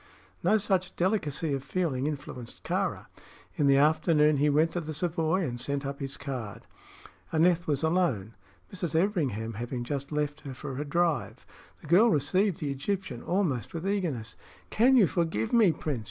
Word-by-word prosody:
No 200 +5 +4
such 185 -3 -1
delicacy 165 -5 0
of 135 -1 -2
feeling 145 -6 -1
influenced 135 -5 -7
Kāra. - - -1 0.5
In 145 - +2
the 135 0 +5
afternoon 150 0 +4
he 145 +2 +3
went 155 +3 +3
to 175 - -2
the 155 -1 -5
Savoy 165 +2 0
and 120 -5 -3
sent 140 0 -1
up 140 0 -4
his 135 0 -4
card. 130 -7 -6 0.7
Aneth 170 +1 +3
was 145 -1 0
alone, 160 - +1 0.4
Mrs. 175 -4 -3
Everingham 145 - 0
having 120 +3 -4
just 140 +2 -4
left 150 0 -2
her 135 -2 -8
for 130 +1 -6
a - - -3
drive. 165 -2 -1 0.4
The - - -12
girl 195 +9 +6
received 185 +4 +1
the 145 -2 -1
Egyptian 140 -2 -3
almost 170 - -1
with 165 +3 -3
eagerness. 155 - -2 0.4
"Can 255 +4 +5
you 220 - +7
forgive 165 - -1
me, 220 -7 +6
Prince?" 150 -5 -3
150 Hz, 170 wpm, -28 LUFS, 135-175 Hz, 0.7 s, you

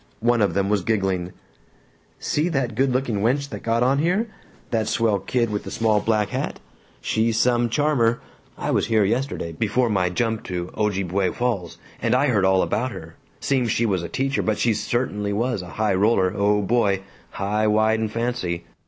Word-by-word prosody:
One 120 0 +2
of 100 -4 +1
them 100 0 +1
was 105 -1 +1
giggling, 95 -3 -1 0.9
"See 155 +4 0
that 135 -7 -1
good 130 +4 +1
looking 125 -5 0
wench 140 +6 +1
that - - -7
got 115 +1 +1
on 135 +3 +2
here? 185 +9 +1 0.4
The 110 -2 0
swell 110 -4 +1
kid 115 +3 -1
with 105 - -2
the - - -7
small 110 -2 +2
black 105 -2 +1
hat? - - -3 0.4
She's 110 - 0
some 120 0 +2
charmer! 125 -3 +2 0.4
I - - -2
was - - +1
here 110 -2 +3
yesterday, 115 -5 -1
before 110 +8 0
my 90 -3 +1
jump 110 +3 -1
to 90 -1 -4
Ojibway 100 -3 0
Falls, 115 -9 -2 0.2
and 115 +1 +2
I 140 +3 +3
heard 105 -6 +2
all 95 0 +4
about 130 +3 -1
her. 80 -5 -9 0.3
Seems 130 -4 0
she 115 +2 +1
was 95 -5 0
a 85 - -6
teacher, 135 +1 -1
but 110 -1 0
she 115 - +2
certainly 105 -3 -1
was 115 0 -1
a 90 - -9
high 110 -2 +2
roller 95 -1 +2
O 105 0 +2
boy! 100 -3 +1 0.3
high, 105 +2 0
wide, 110 +1 +3
and 110 -1 -2
fancy! 115 -8 -2
110 Hz, 190 wpm, -23 LUFS, 100-120 Hz, 0.9 s, all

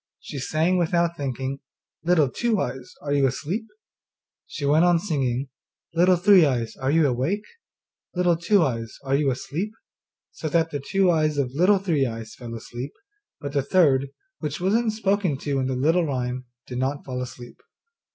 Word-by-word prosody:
she 140 - -7
sang, 160 +7 +1
without 170 0 +1
thinking, 135 -1 -3 0.4
'Little 165 -4 +4
Two 225 - 0
eyes, 125 -4 -4
are 145 -1 -1
you 140 -1 +4
asleep?' 175 - -3 0.8
She 145 - -5
went 150 +4 +4
on 175 -1 +5
singing, 135 -7 -1 0.4
'Little 180 +2 +5
Three 185 0 +6
eyes, 125 -6 0
are 135 0 -1
you 160 +2 +4
awake? 140 - 0 0.7
Little 180 -1 +3
Two 175 +3 +3
eyes, 115 -5 -3
are 135 0 -2
you 140 0 +3
asleep?' 170 - -3 0.6
so 155 - -5
that 165 +1 +2
the 145 - -2
two 190 +6 +2
eyes 155 -2 +1
of 135 -3 0
Little 180 +7 +4
Three 165 -9 +1
eyes 115 -2 -7
fell 120 -2 -8
asleep, 120 +4 -7 0.5
but 140 -1 -6
the 140 - +2
third, 140 -4 +3 0.3
which 150 -2 -3
was 190 +3 +1
not 230 0 +2
spoken 200 -7 0
to 140 0 -2
in 130 - 0
the 130 - -1
little 160 +6 +2
rhyme, 125 -2 -2 0.2
did 125 -1 -5
not 135 +2 -2
fall 125 -1 -4
asleep. 125 -1 -9
145 Hz, 175 wpm, -24 LUFS, 130-175 Hz, 0.8 s, Three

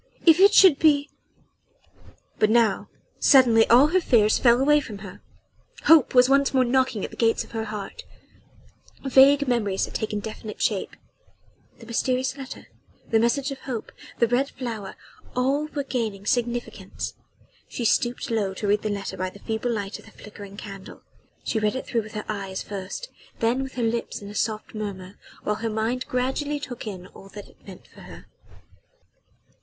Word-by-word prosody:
if 330 0 +7
it 400 +2 +7
should 370 -8 +6
be 290 -2 +3 0.6
...!" - - -28
But 215 - +3
now 225 -3 +2 0.3
suddenly 240 -5 +5
all 255 +6 +6
her 370 +3 +2
fears 215 -8 +3
fell 240 -1 +5
away 295 +2 +4
from 220 -8 -8
her. 185 - -11 0.6
Hope 315 -5 +5
was 250 0 +7
once 275 0 +2
more 260 -1 +4
knocking 250 -4 +1
at - - -9
the - - -11
gates 225 -1 +1
of - - -17
her 225 -1 -3
heart 210 - -7 1.0
vague 275 +1 +5
memories 210 -6 0
had - - -12
taken 215 -1 -2
definite 215 0 -8
shape... - - -1 0.8
the 230 - -14
mysterious 255 +3 -1
letter... 270 -1 -9 0.5
the 225 - +4
message 265 +5 +1
of 270 - -7
hope... 245 -5 -6 0.3
the 235 - +3
red 255 +4 +1
flower... 225 -6 -6 0.4
all 275 +4 +1
were 290 -2 -4
gaining 220 -7 -3
significance. 240 0 -3 0.5
She 240 - -5
stooped 240 +1 0
low 200 -4 -1
to 210 - -5
read 205 +1 +2
the 215 - -2
letter 200 -1 -4
by 185 0 -2
the 195 - -14
feeble 220 +3 -3
light 205 -3 -4
of - - -16
the 220 - -16
flickering 205 -2 -12
candle. 195 -2 -10 0.4
She 220 - -1
read 210 +1 0
it 260 - -4
through 235 - -1
with 215 0 -12
her 210 -1 -5
eyes 195 -3 -4
first 200 - -7 0.3
then 235 +3 +1
with 265 -1 -6
her 245 - -2
lips 230 +1 -2
in 200 0 -9
a - - -10
soft 215 0 -3
murmur, 200 -3 -7 0.2
while 210 - -1
her 225 +1 -3
mind 225 +4 -2
gradually 265 +4 -1
took 245 -5 -7
in 185 -3 -7
all 195 - -14
that 205 - -9
it - - -24
meant - - -12
for - - -17
her. - - -12
235 Hz, 180 wpm, -24 LUFS, 210-265 Hz, 1.0 s, if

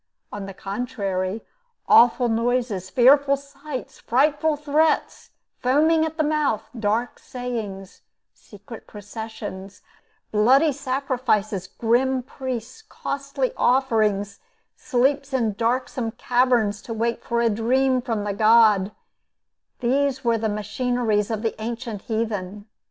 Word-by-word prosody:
On 205 -1 -5
the 195 - -7
contrary, 200 -2 -3 0.4
awful 245 +1 +6
noises, 230 -4 -1
fearful 275 +5 +5
sights, 280 -1 -8
frightful 295 +5 +2
threats, 300 +2 0 0.3
foaming 310 +5 +3
at 320 0 -9
the 310 - +2
mouth, 300 -8 0 0.2
dark 220 +3 -1
sayings, 225 -7 -6 0.3
secret 210 +2 -13
processions, 205 -2 -8 0.5
bloody 260 +9 +4
sacrifices, 255 -8 -1
grim 250 +5 +1
priests, 255 - -6
costly 275 -2 -3
offerings, 215 -6 +1 0.4
sleeps 270 +2 0
in 230 -5 +1
darksome 235 +1 -1
caverns 240 -4 +1
to 230 - -6
wait 230 +1 -1
for 235 0 -1
a 235 - +3
dream 255 +4 +1
from 230 -4 -2
the 205 -1 -2
god 215 -2 +4 0.9
these 270 +2 +1
were 230 -1 +2
the 220 0 -1
machineries 215 0 -1
of 220 -1 -3
the 225 - 0
ancient 230 -2 -5
heathen. 210 -3 -3
235 Hz, 115 wpm, -23 LUFS, 210-265 Hz, 0.9 s, awful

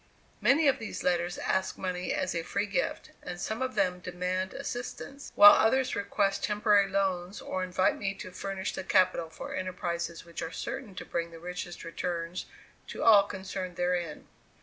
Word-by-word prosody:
Many 300 +2 +5
of 275 - +3
these 225 - -5
letters 175 0 +1
ask 190 0 -1
money 180 -1 -2
as 185 - -1
a 170 - -1
free 200 +5 -1
gift, 200 -2 -2
and 175 -1 -6
some 220 +6 -3
of 255 -2 -2
them 185 -3 +1
demand 180 +1 -2
assistance; 270 +3 -6
while 205 0 +11
others 260 +3 +3
request 200 0 0
temporary 210 -1 +3
loans, 190 -1 -1
or 185 - -3
invite 185 +1 +1
me 195 -1 -2
to 185 -1 -8
furnish 195 +1 -4
the - - -4
capital 185 -3 +3
for - - -7
enterprises 175 -3 -3
which 170 -1 -7
are 165 - -3
certain 265 -4 -5
to - - -6
bring 170 0 -2
the 165 - -11
richest 175 +1 -6
returns 170 +1 -4 0.4
to - - -5
all 215 -3 +8
concerned 190 -2 -5
therein. 175 -3 -1
185 Hz, 170 wpm, -30 LUFS, 175-200 Hz, 0.4 s, while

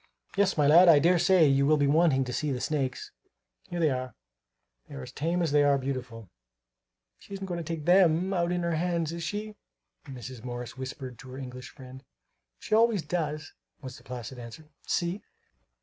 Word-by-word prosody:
Yes, 200 -2 +2
my 150 - +3
lad, 170 +5 +7
I 160 - +8
dare 170 +4 +4
say 185 -2 +5
you 140 0 +3
will 155 +1 +4
be 145 - +2
wanting 145 -2 +3
to 125 -1 -5
see 150 +2 -1
the 130 - -2
snakes. 135 -2 -3 0.6
Here 175 - -4
they 160 -3 +3
are. 130 -1 -4 0.7
They - - -9
are 65 - -7
as - - -9
tame 170 +3 -1
as 160 - 0
they 145 0 +4
are 140 -1 +4
beautiful." 125 -6 -6 0.9
"She 200 - -10
isn't 195 0 -6
going 175 -2 -4
to - - -4
take 160 -2 -5
them 180 0 +4
out 175 -1 0
in 175 -1 -1
her 170 -2 0
hands, 170 -1 -1
is 170 - -5
she?" 210 +4 -5 0.5
Mrs. 125 -2 -9
Morris 120 -1 -6
whispered 130 -1 -7
to 135 -3 -12
her 130 - -8
English 125 -1 -8
friend. 130 -1 -12 0.5
"She - - -6
always 220 -4 +3
does," 155 -2 -3 0.3
was 130 -1 -7
the - - -17
placid 125 0 -8
answer. 135 +7 -11 0.2
"See!" 175 +3 -1
150 Hz, 195 wpm, -28 LUFS, 130-175 Hz, 0.9 s, I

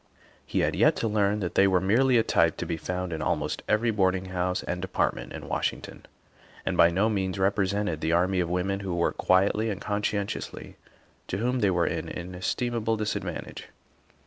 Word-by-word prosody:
He - - 0
had - - +1
yet - - +4
to 115 - -1
learn 105 -1 +1
that 90 - -3
they 100 - +5
were 95 -1 +3
merely 120 +7 +3
a 115 - +4
type - - +2
to - - -3
be 85 - -2
found 90 +2 -4
in 80 - -4
almost - - -1
every 115 +2 +2
boarding 95 -2 +1
house 90 0 -1
and 90 0 -3
department 95 - -1
in - - -8
Washington, - - -3 0.6
and - - -1
by 85 - +6
no 95 +5 +2
means 95 -3 -1
represented 100 -3 0
the 80 - 0
army 90 +2 +2
of 85 -2 0
women 95 +2 -1
who 95 -3 -3
work 85 - 0
quietly 100 +4 +2
and 100 -3 -3
conscientiously, 105 -1 -3 0.5
to 95 - -2
whom 125 +4 0
they 100 - +3
are 85 -2 +2
an 80 -1 -2
in 90 +1 -6
estimable 115 +4 -1
disadvantage. 105 -1 -4
95 Hz, 190 wpm, -27 LUFS, 90-105 Hz, 0.6 s, by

